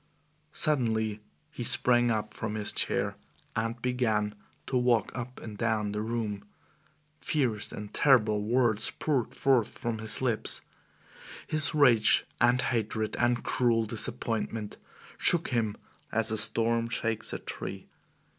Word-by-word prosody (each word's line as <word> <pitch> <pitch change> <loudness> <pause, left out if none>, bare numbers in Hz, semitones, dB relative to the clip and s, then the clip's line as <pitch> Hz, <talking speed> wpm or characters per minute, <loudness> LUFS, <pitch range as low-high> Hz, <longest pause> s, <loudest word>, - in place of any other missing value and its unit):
Suddenly 110 -9 0 0.3
he 125 - -5
sprang 120 0 +3
up 110 -1 -1
from 110 -1 -4
his 105 -1 +2
chair - - 0 0.4
and 115 +1 -2
began 110 -5 0 0.3
to 130 - -3
walk 125 -4 +2
up 125 0 -6
and 110 -2 -8
down 110 -2 0
the 105 +1 -2
room. 110 -3 -3 0.8
Fierce 120 -9 -1
and 105 -1 -8
terrible 110 -7 +4
words 110 -1 +1
poured 135 -7 -1
forth 130 -5 +2
from 115 -2 -3
his 110 0 -4
lips. 120 -4 0 0.8
His 155 -1 +2
rage 120 -7 +5 0.2
and 120 +1 +4
hatred 110 -2 -1
and 120 0 +1
cruel 115 -2 +1
disappointment 110 -1 -2 0.4
shook 170 -1 +2
him 115 -4 -1 0.3
as 110 0 +3
a 110 - 0
storm 115 +2 +2
shakes 115 -1 -2
a - - -3
tree. - - -6
115 Hz, 130 wpm, -29 LUFS, 110-125 Hz, 0.8 s, rage